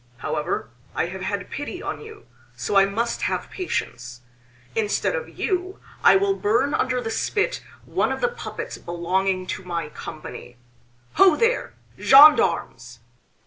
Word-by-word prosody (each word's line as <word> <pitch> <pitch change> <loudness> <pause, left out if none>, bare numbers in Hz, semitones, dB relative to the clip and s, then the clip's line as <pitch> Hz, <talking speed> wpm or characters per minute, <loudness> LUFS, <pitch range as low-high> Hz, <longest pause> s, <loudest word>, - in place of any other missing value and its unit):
However, 135 -4 -3 0.2
I - - +1
have 190 +2 -7
had 200 -1 -4
pity 290 +5 -5
on - - -5
you, 440 -1 -12 0.3
so 205 - -3
I 195 0 +7
must 230 +4 -2
have - - -2
patience. 125 - -4 0.5
Instead 220 - 0
of 480 -1 -4
you 370 -1 -2 0.2
I - - +7
will 395 0 +3
burn 235 - +1
under 255 -1 0
the 225 - -4
spit 430 - -1 0.2
one - - 0
of - - -3
the 485 - +2
puppets 485 0 -7
belonging 185 +2 -1
to 185 - -5
my 170 -4 -4
company. 150 -5 -9 0.6
Ho 380 -4 +7
there, 470 +6 0 0.2
gendarmes!" 130 - +5
215 Hz, 145 wpm, -23 LUFS, -, 0.6 s, I